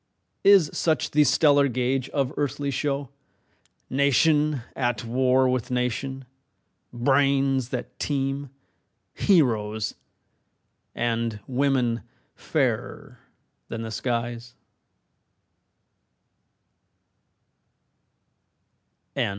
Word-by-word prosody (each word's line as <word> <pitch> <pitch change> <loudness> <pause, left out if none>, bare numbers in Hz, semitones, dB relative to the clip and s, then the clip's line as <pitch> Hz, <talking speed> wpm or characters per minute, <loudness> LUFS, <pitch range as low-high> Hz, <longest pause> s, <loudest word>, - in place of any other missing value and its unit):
Is 195 -7 +6
such 155 -5 0
the 150 0 +5
stellar 145 0 +4
gauge 130 +1 -1
of 135 -3 -1
earthly 145 0 -2
show, 140 0 -2 0.8
Nation 145 0 +2
at 120 -4 -1
war 130 +2 +2
with 125 -1 -1
nation, 125 +2 -2 0.7
brains 135 0 +2
that 125 - -6
teem, 140 -1 -2 0.6
Heroes, 110 - +1 1.0
and 115 -2 -1
women 130 -3 0 0.3
fairer - - -2 0.5
than 115 0 -5
the 110 - -6
skies? 120 0 -3
130 Hz, 70 wpm, -25 LUFS, 120-140 Hz, 1.0 s, Is